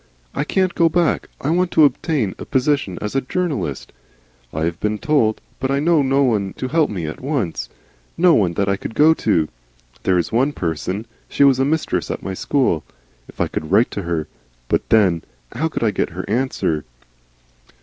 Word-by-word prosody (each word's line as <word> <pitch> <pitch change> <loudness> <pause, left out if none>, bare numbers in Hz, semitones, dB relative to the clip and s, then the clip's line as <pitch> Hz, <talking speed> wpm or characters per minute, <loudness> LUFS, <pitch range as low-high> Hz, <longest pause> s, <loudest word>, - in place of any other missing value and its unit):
I - - -1
can't 185 +3 +1
go 165 -1 +3
back. 170 -1 +1
I 145 - 0
want 180 +1 +2
to 155 - +7
obtain 135 - 0
a - - -6
position 130 -8 0
as 105 - -3
a 135 - +1
journalist. 140 - -3 0.6
I 80 - -2
have 85 +1 -2
been 105 0 -1
told 115 -4 +1 0.2
But 130 - -1
I 140 0 +1
know 160 +1 +3
no 135 +1 +2
one 105 -7 +1
to 130 - -4
help 160 0 +2
me 90 -6 -4
at 75 - -6
once. 115 - -2 0.5
No 175 0 +5
one 95 - +3
that 100 +3 0
I 100 0 +1
could 110 - -7
go 155 +4 +6
to. 85 - +1 0.5
There 90 - +2
is 85 - -1
one 130 +6 +2
person 90 - -3 0.2
She - - +2
was 135 -2 +5
a 135 - +3
mistress 160 +2 -1
at - - -4
my 95 - -3
school. 95 - +1 0.4
If - - -16
I - - +2
could 80 - -5
write 110 +6 +4
to 100 - -3
her 85 -3 -2 0.4
But - - 0
then, 95 -7 +4 0.3
how 155 +6 -1
could 155 - -3
I 110 - +3
get - - -1
her 90 - -4
answer?" 110 - 0
125 Hz, 200 wpm, -20 LUFS, 95-150 Hz, 0.6 s, to